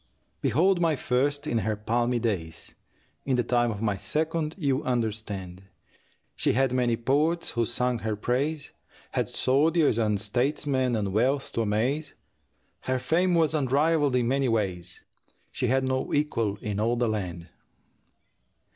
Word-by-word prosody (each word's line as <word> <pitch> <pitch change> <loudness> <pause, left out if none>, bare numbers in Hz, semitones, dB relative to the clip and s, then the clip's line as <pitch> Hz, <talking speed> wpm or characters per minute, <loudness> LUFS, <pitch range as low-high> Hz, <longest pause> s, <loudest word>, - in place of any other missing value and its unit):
Behold 185 +2 +2
my 165 -2 +3
first! 140 +3 0
In 120 -6 0
her 110 0 -1
palmy 120 +3 0
days 90 -9 -3 0.5
(In 135 - 0
the 125 - +1
time 120 0 +1
of 110 -1 -4
my 105 -3 +1
second, 155 - -1
you 140 -5 0
understand) 105 -6 -3 0.7
She - - +1
had 135 0 +2
many 120 -2 +1
poets 150 +8 +1
who 115 -2 0
sang 125 0 0
her 110 -1 -2
praise, 140 +7 -1 0.4
Had - - -1
soldiers 150 -1 +2
and 105 -2 +1
statesmen 130 +3 0
and 100 -3 -2
wealth 130 +6 +1
to 115 - -1
amaze, 125 +8 -1 0.6
Her 130 0 -1
fame 175 +7 +1
was 160 -2 +3
unrivalled 145 0 +2
in 120 -2 +2
many 135 0 +1
ways 90 -6 -2 0.5
She 125 - -2
had 130 +2 +2
no 130 0 -1
equal 115 -9 0
in 105 -1 -2
all 115 +3 +1
the 120 0 +1
land. 90 -6 -4
125 Hz, 145 wpm, -27 LUFS, 110-145 Hz, 0.7 s, my